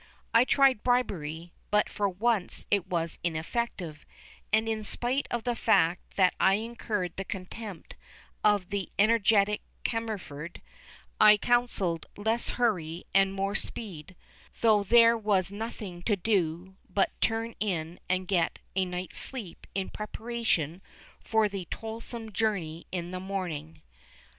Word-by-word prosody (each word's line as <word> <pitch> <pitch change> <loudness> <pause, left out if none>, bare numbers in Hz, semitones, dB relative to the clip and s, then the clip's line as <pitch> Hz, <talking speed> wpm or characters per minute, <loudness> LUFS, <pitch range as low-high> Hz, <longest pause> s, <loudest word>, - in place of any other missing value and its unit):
I 230 +2 +6
tried 270 -5 +4
bribery, 175 -10 -1 0.2
but 210 0 +3
for 200 -1 -1
once 205 0 0
it 200 -3 +2
was 170 -3 -2
ineffective, 170 -1 -3 0.5
and 220 +1 +3
in 220 -1 -1
spite 250 +6 0
of 235 -2 -2
the 245 - 0
fact 175 -7 +2
that 185 -2 +4
I 195 - +5
incurred 215 -4 -3
the 195 - -2
contempt 190 0 -7 0.5
of 205 -4 +3
the 200 -2 -2
energetic 210 -1 +4 0.2
Cammerford, 195 -9 -4 0.6
I 210 0 +8
counselled 205 -8 +1
less 220 +3 +1
hurry 180 -9 0
and 195 0 +5
more 195 +1 -1
speed, 185 -7 -1 0.5
though 215 -3 +5
there 230 +3 +6
was 200 -3 +1
nothing 205 -4 -6
to 210 +3 +1
do 185 -2 -1
but 190 +1 +2
turn 225 0 0
in 175 -5 -2
and 185 0 0
get 175 -4 +1 0.2
a 190 -1 +2
night's 180 0 -2
sleep 225 -10 -3
in 195 -1 -1
preparation 210 -7 -2 0.4
for 220 -2 +2
the 195 -3 -5
toilsome 225 +2 -6
journey 180 -6 -1
in 175 -1 -3
the 185 - -4
morning. 175 - -5
200 Hz, 135 wpm, -29 LUFS, 180-225 Hz, 0.6 s, I